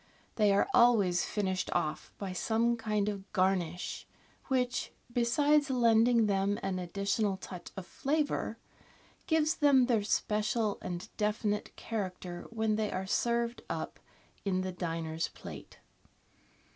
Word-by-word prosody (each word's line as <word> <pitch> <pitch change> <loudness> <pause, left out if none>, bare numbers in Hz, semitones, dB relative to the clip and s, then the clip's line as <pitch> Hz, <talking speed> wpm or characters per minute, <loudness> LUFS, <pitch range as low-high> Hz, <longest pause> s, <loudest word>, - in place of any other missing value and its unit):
They 210 -2 +4
are 200 - +3
always 210 - +5
finished 190 -3 -1
off 155 -3 -2
by 195 -2 -4
some 230 +5 +1
kind 215 -3 -1
of 200 -1 -4
garnish, 185 -3 0 0.4
which, 255 -1 0 0.2
besides 285 +5 +3
lending 235 -2 +4
them 200 0 +1
an 190 -1 -1
additional 200 +3 -1
touch 180 -2 -8
of 190 - -5
flavour, 295 +7 -1 0.7
gives 315 -1 +3
them 280 -5 +5
their 235 -4 +2
special 210 +1 0
and 175 0 -5
definite 210 0 -1
character 185 -5 -5
when 220 -2 0
they 215 -1 -1
are 185 +1 -2
served 235 +3 0
up - - -4 0.4
in 185 -2 0
the 185 0 -3
diner's 165 -2 -3
plate. - - -10
210 Hz, 125 wpm, -31 LUFS, 185-235 Hz, 0.7 s, always